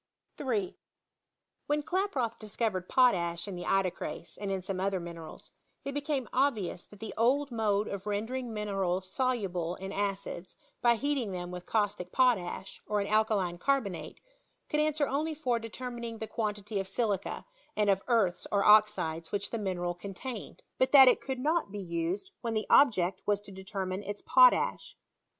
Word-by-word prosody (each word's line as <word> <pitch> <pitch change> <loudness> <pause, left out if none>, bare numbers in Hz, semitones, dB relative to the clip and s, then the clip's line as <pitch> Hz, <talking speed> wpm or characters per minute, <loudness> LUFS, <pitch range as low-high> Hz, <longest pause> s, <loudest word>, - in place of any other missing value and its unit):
3. 220 -10 -2 0.9
When 295 0 +1
Klaproth 300 - -1
discovered 210 -3 -2
potash 175 -8 +3
in 200 - -5
the 175 - -6
ido« 195 -2 +2
erase, - - -6
and 200 -1 -5
in 190 -1 -2
some 190 -1 -3
other 195 0 0
minerals, 170 -2 -9 0.3
it 275 - -2
became 285 -2 -2
obvious 225 -10 0
that 205 - -16
the 220 0 -6
old 265 +5 +2
mode 215 -2 +1
of 200 0 -5
rendering 230 +4 -2
minerals 195 -3 -1
soluble 190 -8 -1
in 195 +1 -7
acids 195 -3 -3 0.3
by 240 -1 +5
heating 265 -5 -1
them 175 -1 -5
with 180 0 -8
caustic 200 -5 0
potash, 225 -8 +1
or 210 -1 +1
an 200 - 0
alkaline 205 -5 +1
carbonate, 245 -8 -1 0.5
could 300 - +1
answer 305 -1 +2
only 305 +3 -1
for 250 -6 0
deter 240 +3 -6
mining 235 -1 -6
the 220 - -4
quantity 210 -2 -3
of 195 - -3
silica, 200 -1 -1 0.3
and 210 -1 +2
of 195 -1 +3
earths 220 -8 +2
or 200 -1 +3
oxides^ 210 -7 +4
which 200 -1 -2
the 230 - -2
mineral 180 -3 -2
contained; 200 +6 -7 0.2
but 260 - +3
that 270 -2 +10
it 250 - +5
could 265 -1 -3
not 305 - 0
be 205 - -6
used 175 - -3
when 230 -2 -2
the 215 - 0
object 195 -10 +4
was 205 -1 +3
to 205 -1 -11
determine 190 0 -4
its 205 0 -6
potash. 255 -1 +4
210 Hz, 170 wpm, -30 LUFS, 190-250 Hz, 0.9 s, that